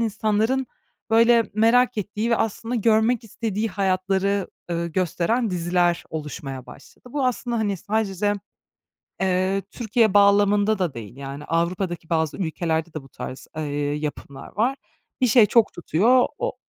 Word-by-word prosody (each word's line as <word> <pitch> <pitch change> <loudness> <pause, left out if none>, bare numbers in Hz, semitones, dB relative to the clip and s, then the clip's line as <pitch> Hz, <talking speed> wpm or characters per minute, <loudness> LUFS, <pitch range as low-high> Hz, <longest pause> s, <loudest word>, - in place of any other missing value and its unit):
insanların, 220 +3 0 0.4
böyle, 230 +1 +4
merak 230 +2 +3
ettiği 210 +3 -2
ve 230 - +4
aslında 225 +3 -2
görmek 225 +1 +2
istediği 220 0 -3
hayatları, 195 0 0 0.2
ııı, 170 0 -1
gösteren 185 +7 0
diziler 175 0 +1
oluşmaya 140 -4 -6
başladı. - - -15
Bu 280 -3 +1
aslında, 240 -1 -1
hani, 205 -3 0
sadece, 205 0 -1 0.9
eee, 190 +1 +1
Türkiye 220 -3 +1
bağlamında 205 +1 +4
da 175 -6 0
değil, 115 0 -9
yani, 140 +1 -7
Avrupa'daki 175 +1 -2
bazı 160 -2 0
ülkelerde 165 -2 -2
de 155 - -5
bu 135 - -16
tarz, 130 - -8
eee, 155 - -2 0.3
yapımlar 145 -2 -6
var. 255 +6 +1 0.4
Bir 250 - +4
şey 230 -1 +6
çok 225 +1 +3
tutuyor, 225 +10 +3
o - - -2
200 Hz, 135 wpm, -23 LUFS, 170-225 Hz, 0.9 s, şey